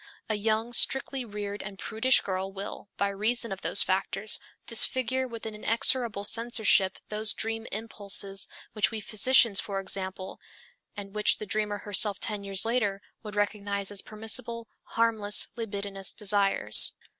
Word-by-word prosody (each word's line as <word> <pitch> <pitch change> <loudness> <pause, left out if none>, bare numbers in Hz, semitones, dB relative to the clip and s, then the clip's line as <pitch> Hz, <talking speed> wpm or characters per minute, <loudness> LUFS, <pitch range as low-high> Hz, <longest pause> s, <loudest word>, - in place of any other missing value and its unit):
A - - +1
young, 220 +3 -1
strictly 265 +2 +2
reared 205 -2 -6
and 195 -1 -8
prudish 230 +6 +2
girl 190 0 -4
will, 200 +1 -8
by 200 - 0
reason 220 +3 +1
of 195 - -6
those - - +2
factors, 195 +2 -1 0.3
disfigure 260 +2 +2
with 230 -2 -8
an 220 - -5
inexorable 225 0 +1
censorship 220 -3 +3
those 215 0 +1
dream 225 0 -2
impulses 200 -2 -1 0.3
which 215 -1 +2
we 225 - -4
physicians, 215 0 +5
for 195 -2 -3
example, 190 0 -3 0.6
and 200 -1 -8
which 210 0 +2
the 215 - -6
dreamer 210 0 -1
herself 205 0 +2
ten 210 -2 -2
years 195 0 -2
later, 220 -4 0 0.2
would 210 -2 -9
recognize 200 -1 -2
as 200 - -2
permissible, 225 +2 -4 0.3
harmless, 220 -3 +1
libidinous 200 -4 -4
desires. 200 - +4
210 Hz, 145 wpm, -27 LUFS, 200-225 Hz, 0.6 s, physicians